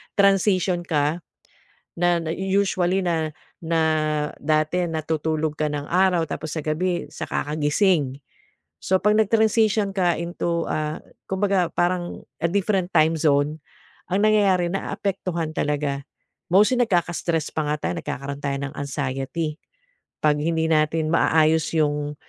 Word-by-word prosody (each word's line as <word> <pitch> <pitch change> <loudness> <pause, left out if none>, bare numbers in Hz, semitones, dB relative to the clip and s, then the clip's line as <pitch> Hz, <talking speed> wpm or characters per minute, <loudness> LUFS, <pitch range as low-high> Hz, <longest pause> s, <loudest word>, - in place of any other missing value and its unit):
transition 195 -2 +3
ka 150 0 0 0.8
na 175 0 +2
na 160 - -4
usually 190 -1 +1
na 165 -4 -1 0.3
na 165 -1 0 0.6
dati 155 +4 +1
natutulog 155 -1 -2
ka 155 - 0
ng 145 -1 -3
araw 180 -2 +3
tapos 155 - -5
sa 155 - -2
gabi 175 +3 -1
saka - - -3
ka 150 - -3
gising 150 -3 +1 0.6
so 190 - +2
pag 210 +1 +3
nag-transition 220 -1 +3
ka 180 -3 +2
into, 170 0 -2
ah, 155 0 -2 0.3
kumbaga 190 -1 +1
parang 175 0 -1 0.2
a 170 - +2
different 195 -1 0
time 160 +1 +4
zone 150 -1 +2 0.5
ang 190 +2 +2
nangyayari 200 -5 +3
naaapektuhan 185 -4 -3
talaga 145 -1 -1 0.5
mostly 210 +7 +4
nagkaka 175 -7 +1
stress 160 -3 -1
pa 155 - -1
nga 150 - +1
tayo - - -1
nagkakaroon 140 -2 -5
tayo 140 - -1 0.2
ng - - -13
anxiety 140 +3 -3 0.7
pag 150 -1 +3
hindi 160 +1 0
natin 155 0 +2
maayos 160 -1 +3
yung 150 -1 0
165 Hz, 130 wpm, -23 LUFS, 155-185 Hz, 0.8 s, time